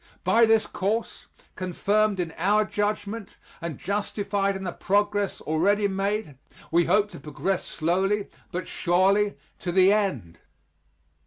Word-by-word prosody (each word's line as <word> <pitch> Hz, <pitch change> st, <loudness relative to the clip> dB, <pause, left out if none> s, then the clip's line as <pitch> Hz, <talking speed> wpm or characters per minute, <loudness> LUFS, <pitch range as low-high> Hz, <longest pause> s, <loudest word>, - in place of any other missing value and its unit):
By 230 Hz, 0 st, +5 dB
this 225 Hz, -1 st, +4 dB
course, 210 Hz, +4 st, -3 dB, 0.3 s
confirmed 200 Hz, +3 st, +1 dB
in 165 Hz, -2 st, -2 dB
our 210 Hz, +5 st, +2 dB
judgment, 205 Hz, +1 st, -3 dB, 0.2 s
and 165 Hz, -5 st, -4 dB
justified 200 Hz, -1 st, -1 dB
in 190 Hz, -, -5 dB
the 180 Hz, -, -2 dB
progress 205 Hz, +1 st, 0 dB
already 200 Hz, +7 st, +2 dB
made, 195 Hz, -6 st, -2 dB, 0.3 s
we 170 Hz, +1 st, +4 dB
hope 205 Hz, +3 st, +2 dB
to -, -, -9 dB
progress 155 Hz, +6 st, -2 dB
slowly 190 Hz, +5 st, 0 dB, 0.2 s
but 180 Hz, 0 st, -4 dB
surely 195 Hz, +4 st, +2 dB, 0.2 s
to 175 Hz, -, -3 dB
the 190 Hz, +2 st, +5 dB
end. 140 Hz, -, -1 dB
200 Hz, 130 wpm, -26 LUFS, 180-210 Hz, 0.3 s, By